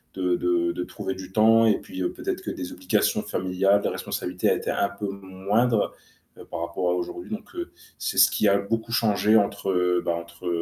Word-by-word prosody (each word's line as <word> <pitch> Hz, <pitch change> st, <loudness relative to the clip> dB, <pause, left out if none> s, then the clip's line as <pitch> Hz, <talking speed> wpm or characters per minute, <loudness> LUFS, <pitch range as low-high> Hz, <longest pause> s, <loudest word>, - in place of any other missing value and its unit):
de 90 Hz, -2 st, +1 dB
de 90 Hz, -, -3 dB
trouver 95 Hz, -1 st, -5 dB
du 95 Hz, 0 st, -9 dB
temps 115 Hz, +2 st, +5 dB
et 110 Hz, -, +3 dB
puis 95 Hz, 0 st, -7 dB
peut-être -, -, -4 dB
que -, -, -4 dB
des 90 Hz, -1 st, -6 dB
obligations 90 Hz, 0 st, +1 dB
familiales, 95 Hz, +2 st, +1 dB
des -, -, 0 dB
responsabilités 90 Hz, 0 st, -1 dB
étaient -, -, -2 dB
un 100 Hz, -, +1 dB
peu 100 Hz, +1 st, -5 dB
moindres 100 Hz, +4 st, 0 dB, 0.6 s
par -, -, -4 dB
rapport 85 Hz, +1 st, -1 dB
à -, -, +2 dB
aujourd'hui 280 Hz, -, -5 dB
donc 215 Hz, +10 st, -6 dB
heu, 345 Hz, 0 st, -5 dB, 0.3 s
c'est -, -, -3 dB
ce -, -, +7 dB
qui 105 Hz, -, +2 dB
a 100 Hz, -, +4 dB
beaucoup 115 Hz, +3 st, -3 dB
changé 110 Hz, -1 st, +3 dB
entre, 95 Hz, -3 st, +1 dB
bah, 85 Hz, -, +1 dB
entre 85 Hz, +1 st, -8 dB
95 Hz, 185 wpm, -25 LUFS, 90-110 Hz, 0.6 s, ce